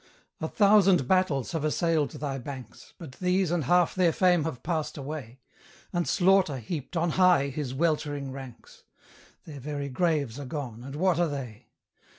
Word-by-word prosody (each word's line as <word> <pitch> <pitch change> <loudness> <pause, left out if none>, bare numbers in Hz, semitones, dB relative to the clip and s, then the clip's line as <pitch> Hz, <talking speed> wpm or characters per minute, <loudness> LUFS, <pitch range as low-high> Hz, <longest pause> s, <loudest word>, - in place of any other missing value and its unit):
A 160 - -2
thousand 195 - +4
battles 150 - +1
have 160 -3 -2
assailed 155 -1 +1
thy 140 -2 -4
banks, 130 -3 -10
But 160 -6 -9
these 180 -1 +1
and 170 -5 0
half 175 +4 +3
their 180 -3 +3
fame 180 -3 +3
have 125 -6 -5
passed 160 -4 -2
away, 135 -3 -7 0.5
And 175 -1 0
Slaughter 185 -6 +3
heaped 145 +6 -5
on 165 0 +1
high 180 -6 +4
his 135 -2 -4
weltering 145 -3 -1
ranks: 130 -3 -11 0.6
Their 145 -3 -9
very 145 +1 -4
graves 145 -4 0
are 145 - -6
gone, 125 -5 -6
and 135 +2 -8
what 175 +1 +2
are 175 - +3
they? 125 -5 -7
150 Hz, 165 wpm, -27 LUFS, 135-175 Hz, 0.6 s, thousand